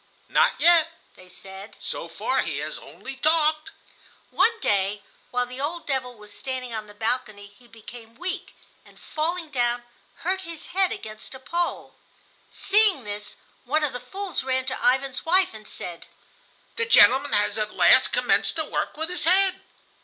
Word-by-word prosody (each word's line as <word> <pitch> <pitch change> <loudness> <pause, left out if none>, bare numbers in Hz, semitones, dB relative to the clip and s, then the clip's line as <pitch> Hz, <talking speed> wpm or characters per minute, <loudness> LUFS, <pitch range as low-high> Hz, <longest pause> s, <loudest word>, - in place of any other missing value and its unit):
"Not - - +3
yet," 335 -1 +5 0.2
they 185 0 -17
said; 190 +2 -10
"so - - -5
far - - -1
he - - -3
has - - -4
only 270 0 -9
talked." 310 +3 +2 0.6
One 460 0 +2
day, 200 - 0 0.3
while 250 0 0
the 250 +2 -8
old 330 +3 -3
devil 255 -3 -2
was 210 -1 -12
standing 255 -2 -4
on 215 -1 -5
the 205 - -15
balcony, 220 -2 -1
he 245 - -20
became 230 0 -13
weak, 370 +3 -4 0.3
and, - - -20
falling 325 +1 -3
down, 240 -2 0 0.4
hurt 380 +2 0
his 335 -4 -9
head 380 0 +2
against 215 +4 -7
a - - -10
pole. 340 +6 -3 0.6
Seeing 405 - +4
this, 205 0 -6 0.3
one 305 +5 0
of 295 - -1
the 250 - -4
fools 370 +8 -4
ran 260 0 -1
to 260 - -1
Ivan's 260 +2 +1
wife 365 0 +3
and 215 -1 -12
said, 175 -1 -7 0.7
"The 465 +1 0
gentleman - - +6
has - - +1
at - - -2
last - - +6
commenced - - +2
to - - 0
work - - -3
with 320 +2 -1
his 360 - -1
head." 380 +2 +3
265 Hz, 170 wpm, -24 LUFS, 230-340 Hz, 0.7 s, gentleman